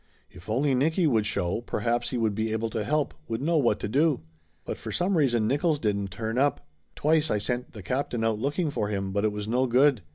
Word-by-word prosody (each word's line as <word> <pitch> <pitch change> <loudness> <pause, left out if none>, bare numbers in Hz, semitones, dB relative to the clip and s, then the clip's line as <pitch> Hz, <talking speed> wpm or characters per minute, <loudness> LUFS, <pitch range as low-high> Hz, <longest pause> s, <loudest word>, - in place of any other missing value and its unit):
If 90 +3 -14
only 135 +5 +2
Nicky 160 +7 +2
would 110 -8 +2
show, 100 -1 -1
perhaps 120 0 -1
he 125 - -2
would 110 -3 +1
be 110 +1 -1
able 110 +1 -1
to 110 - -2
help, 150 +5 0
would 115 0 -2
know 160 +5 +1
what 120 -6 +2
to - - -2
do. 140 +4 +2 0.4
But - - -5
for - - -6
some 185 +2 +1
reason 120 -8 +2
Nickolls 145 +3 +1
didn't 100 -4 0
turn 110 +5 -3
up. 145 +1 +1 0.3
Twice 155 +1 +2
I 105 - +2
sent 125 +4 -3
the 105 -5 -9
captain 125 0 -2
out 110 -1 +1
looking 145 +5 -1
for 105 - -1
him, 100 -2 -2
but 100 +2 0
it 105 - +2
was 105 0 -5
no 125 +3 +1
good. 130 0 +4
120 Hz, 230 wpm, -27 LUFS, 105-145 Hz, 0.4 s, good